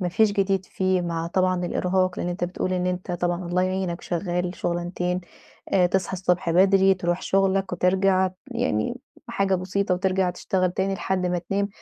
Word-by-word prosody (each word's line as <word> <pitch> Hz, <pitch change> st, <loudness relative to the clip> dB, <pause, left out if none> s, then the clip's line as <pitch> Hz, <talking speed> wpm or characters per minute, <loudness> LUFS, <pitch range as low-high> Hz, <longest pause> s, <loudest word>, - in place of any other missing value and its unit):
ما 180 Hz, -, 0 dB
فيش 205 Hz, +4 st, +3 dB
جديد 195 Hz, -2 st, +1 dB
فيه 185 Hz, -1 st, 0 dB
مع 165 Hz, -1 st, -2 dB
طبعًا 185 Hz, 0 st, +1 dB
الإرهاق. 185 Hz, 0 st, 0 dB
لإن -, -, -2 dB
أنت 175 Hz, 0 st, -2 dB
بتقول 180 Hz, +1 st, -2 dB
إن 180 Hz, 0 st, 0 dB
أنت 180 Hz, 0 st, -3 dB
طبعًا 175 Hz, +1 st, -1 dB
الله 180 Hz, +1 st, +1 dB
يعينك 185 Hz, -2 st, -1 dB
شغّال 175 Hz, 0 st, -2 dB
شغلانتين. 175 Hz, +1 st, -2 dB, 0.5 s
آآ 185 Hz, -2 st, +5 dB
تصحى 190 Hz, +1 st, -1 dB
الصبح 180 Hz, -1 st, 0 dB
بدري، 190 Hz, +2 st, +5 dB
تروح 175 Hz, -1 st, -2 dB
شغلك 195 Hz, 0 st, +1 dB
وترجع. 185 Hz, +1 st, +2 dB, 0.2 s
يعني 245 Hz, 0 st, -1 dB, 0.3 s
حاجة 195 Hz, -4 st, +1 dB
بسيطة 185 Hz, +1 st, 0 dB
وترجع 185 Hz, 0 st, +1 dB
تشتغل 185 Hz, +1 st, 0 dB
تاني 195 Hz, +1 st, -1 dB
لحد 190 Hz, -1 st, -1 dB
ما 180 Hz, 0 st, 0 dB
تنام. 195 Hz, +4 st, -1 dB
185 Hz, 170 wpm, -24 LUFS, 180-190 Hz, 0.5 s, آآ